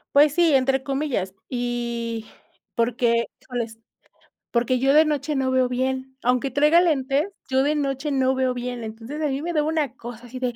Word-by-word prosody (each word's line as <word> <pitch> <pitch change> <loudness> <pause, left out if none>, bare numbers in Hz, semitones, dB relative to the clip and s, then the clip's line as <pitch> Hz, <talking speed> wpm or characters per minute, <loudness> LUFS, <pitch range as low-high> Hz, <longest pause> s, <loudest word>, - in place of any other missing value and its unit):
Pues 290 0 +6
sí, 335 -3 +4
entre 265 0 +2
comillas. 270 -10 -2
Y 235 -2 -3 0.5
porque, 235 0 +2 0.2
híjoles, 235 -3 -5 0.7
porque 245 +1 +1
yo 270 +2 +3
de 310 +2 +7
noche 300 0 -1
no 265 -1 +1
veo 260 -1 +2
bien, 260 +1 -2
aunque 250 +2 +2
traiga 300 +5 +5
lentes, 285 -3 +1 0.2
yo 265 0 +3
de 290 +3 +1
noche 280 0 -1
no 265 -1 +2
veo 260 -1 +1
bien. 245 -1 -4
Entonces, 225 +7 -7
a 305 - +1
mí 275 0 -2
me 345 +1 -2
daba 300 -1 +1
una 305 -5 -1
cosa 240 -1 -9
así 250 +2 -8
de, 250 -2 -2
260 Hz, 180 wpm, -24 LUFS, 245-285 Hz, 0.7 s, de